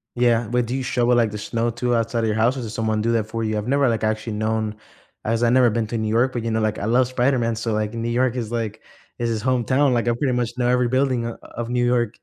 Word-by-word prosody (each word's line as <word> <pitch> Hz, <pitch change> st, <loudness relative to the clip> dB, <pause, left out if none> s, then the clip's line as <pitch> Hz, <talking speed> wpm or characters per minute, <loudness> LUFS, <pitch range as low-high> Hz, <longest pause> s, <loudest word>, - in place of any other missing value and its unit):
Yeah, 120 Hz, -2 st, +2 dB
but 125 Hz, 0 st, +1 dB
do 120 Hz, -, -3 dB
you 135 Hz, -, -2 dB
shovel, 125 Hz, -2 st, +2 dB
like, 115 Hz, -3 st, +2 dB
the 105 Hz, -, -5 dB
snow 115 Hz, +3 st, -1 dB
to 120 Hz, +1 st, -1 dB
outside 115 Hz, +1 st, 0 dB
of -, -, +1 dB
your 105 Hz, -, 0 dB
house 115 Hz, +4 st, +2 dB
or -, -, -3 dB
does 110 Hz, -2 st, -6 dB
someone 110 Hz, -1 st, -1 dB
do 115 Hz, -, +1 dB
that 115 Hz, -2 st, +1 dB
for 115 Hz, +1 st, -3 dB
you? 110 Hz, -1 st, -1 dB
I've 105 Hz, +2 st, -3 dB
never 140 Hz, 0 st, +3 dB
like 115 Hz, -2 st, 0 dB
actually 110 Hz, +1 st, -1 dB
known, 110 Hz, 0 st, -1 dB, 0.5 s
as 115 Hz, +2 st, 0 dB
I 120 Hz, -, +4 dB
never 125 Hz, 0 st, +5 dB
been 115 Hz, 0 st, -1 dB
to 115 Hz, -, -3 dB
New 110 Hz, -1 st, -1 dB
York, 120 Hz, +4 st, +2 dB
but, 120 Hz, -, -3 dB
you 115 Hz, -, -2 dB
know, 110 Hz, -, 0 dB
like, 110 Hz, -1 st, -1 dB
I -, -, -3 dB
love 125 Hz, +3 st, +3 dB
Spider-Man, 125 Hz, -2 st, +1 dB
so, 115 Hz, 0 st, -2 dB
like, 105 Hz, 0 st, -1 dB
New 115 Hz, 0 st, -3 dB
York 125 Hz, +1 st, +1 dB
is, 120 Hz, -3 st, -4 dB
like 110 Hz, -2 st, -3 dB, 0.4 s
is 120 Hz, -1 st, 0 dB
his 110 Hz, -2 st, -2 dB
hometown, 130 Hz, +3 st, +2 dB
like, 120 Hz, 0 st, 0 dB
I -, -, +4 dB
pretty 130 Hz, +2 st, 0 dB
much 120 Hz, -1 st, 0 dB
know 120 Hz, -, +2 dB
every 125 Hz, 0 st, +2 dB
building 130 Hz, -1 st, +1 dB
o 115 Hz, -, -5 dB, 0.2 s
of 120 Hz, 0 st, -4 dB
New 125 Hz, 0 st, +1 dB
York. 120 Hz, -2 st, +1 dB
115 Hz, 290 wpm, -22 LUFS, 110-125 Hz, 0.5 s, never